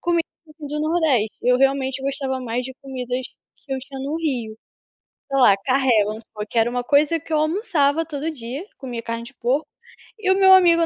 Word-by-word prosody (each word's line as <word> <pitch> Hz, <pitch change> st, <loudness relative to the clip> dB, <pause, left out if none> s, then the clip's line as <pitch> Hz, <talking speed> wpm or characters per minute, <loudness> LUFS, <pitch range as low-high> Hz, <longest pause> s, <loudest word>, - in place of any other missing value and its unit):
comida 340 Hz, -1 st, +1 dB, 0.3 s
do 300 Hz, 0 st, -4 dB
nordeste. 305 Hz, -9 st, +1 dB
Eu 250 Hz, +1 st, +3 dB
realmente 270 Hz, -1 st, +1 dB
gostava 270 Hz, -1 st, -2 dB
mais 245 Hz, 0 st, -2 dB
de 260 Hz, -, -6 dB
comidas 255 Hz, -2 st, -4 dB, 0.3 s
que 275 Hz, -, -8 dB
eu 265 Hz, -, -2 dB
tinha 270 Hz, 0 st, -9 dB
no 280 Hz, +4 st, -2 dB
Rio. 250 Hz, -9 st, -2 dB, 0.7 s
Sei 275 Hz, -, 0 dB
lá, 200 Hz, -6 st, +7 dB
carré 265 Hz, 0 st, +2 dB
vamos 215 Hz, +2 st, -5 dB
supor, 210 Hz, -1 st, -7 dB
que 230 Hz, -, -2 dB
era 225 Hz, -, +4 dB
uma 245 Hz, 0 st, -2 dB
coisa 295 Hz, +4 st, +3 dB
que 320 Hz, -, -10 dB
eu 310 Hz, -, +3 dB
almoçava 315 Hz, -2 st, +1 dB
todo 305 Hz, 0 st, -4 dB
dia, 270 Hz, -, -6 dB
comia 245 Hz, -4 st, -6 dB
carne 230 Hz, 0 st, -4 dB
de 260 Hz, +3 st, -13 dB
porco, 260 Hz, +6 st, 0 dB, 0.5 s
e 390 Hz, -4 st, +1 dB
o -, -, +5 dB
meu 380 Hz, -1 st, +8 dB
amigo 340 Hz, -3 st, +6 dB
275 Hz, 200 wpm, -22 LUFS, 250-315 Hz, 0.7 s, meu